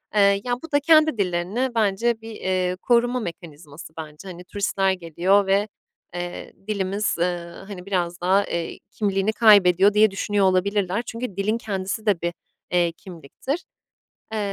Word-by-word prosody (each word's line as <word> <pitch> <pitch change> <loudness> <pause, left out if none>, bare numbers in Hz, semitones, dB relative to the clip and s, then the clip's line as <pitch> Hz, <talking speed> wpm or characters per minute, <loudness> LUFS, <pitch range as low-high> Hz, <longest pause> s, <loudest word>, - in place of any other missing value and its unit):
Eee, 200 -1 +4
ya, 245 - -1
bu 325 - -9
da 285 - +4
kendi 310 -2 +4
dillerini 190 +6 -1
bence 225 +2 +1
bir, 225 0 -9
eee, 185 -3 -1
koruma 245 +1 +2
mekanizması 160 -5 -9
bence. 155 +3 -9
Hani, 180 -1 -9
turistler 195 0 0
geliyor 185 +3 +1
ve, 200 +2 +2 0.5
eee, 175 0 -6
dilimiz, 200 0 -1
eee, 175 0 -1 0.2
hani, 185 -3 -8
biraz 175 -3 -2
daha, 190 +3 +3
eee, 170 -1 -4
kimliğini 200 0 0
kaybediyor 200 -3 +6
diye 215 0 +5
düşünüyor 200 0 0
olabilirler. 190 +2 +1
Çünkü 230 -3 -5
dilin 210 +3 0
kendisi 200 -1 -4
de 200 -6 +2
bir, 170 0 -2 0.4
eee, 175 -1 +2
kimliktir. 180 - -6 0.7
Eee, - - -1
195 Hz, 150 wpm, -23 LUFS, 180-215 Hz, 0.7 s, kaybediyor